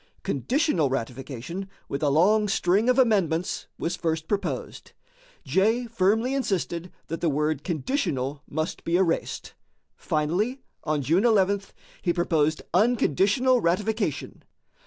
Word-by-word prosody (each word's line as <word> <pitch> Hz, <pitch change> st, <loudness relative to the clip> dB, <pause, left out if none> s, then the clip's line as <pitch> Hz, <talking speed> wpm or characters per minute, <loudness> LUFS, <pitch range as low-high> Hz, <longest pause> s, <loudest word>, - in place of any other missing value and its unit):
Conditional 210 Hz, -, +1 dB
ratification, 135 Hz, +8 st, -5 dB, 0.2 s
with 140 Hz, -, -4 dB
a 150 Hz, -, +2 dB
long 205 Hz, +9 st, +4 dB
string 195 Hz, +4 st, +2 dB
of 250 Hz, -, +3 dB
amendments, 190 Hz, -, +1 dB
was 170 Hz, +2 st, -2 dB
first 160 Hz, -2 st, -2 dB
proposed. 200 Hz, -2 st, -3 dB, 0.5 s
Jay 205 Hz, -, +2 dB
firmly 225 Hz, +3 st, +1 dB
insisted 185 Hz, -9 st, -2 dB
that 165 Hz, -, -5 dB
the 170 Hz, -, +2 dB
word 150 Hz, 0 st, 0 dB
"conditional" 150 Hz, -, -2 dB
must 155 Hz, +2 st, -3 dB
be 170 Hz, +1 st, +1 dB
erased. 180 Hz, -3 st, -1 dB, 0.4 s
Finally, 185 Hz, -, -1 dB, 0.2 s
on 150 Hz, -2 st, -1 dB
July 175 Hz, -, +3 dB
11, 200 Hz, -2 st, +3 dB, 0.4 s
he 175 Hz, -, +1 dB
proposed 160 Hz, -3 st, +1 dB
unconditional 230 Hz, -, +3 dB
ratification. 190 Hz, -, -1 dB
180 Hz, 115 wpm, -26 LUFS, 155-215 Hz, 0.5 s, long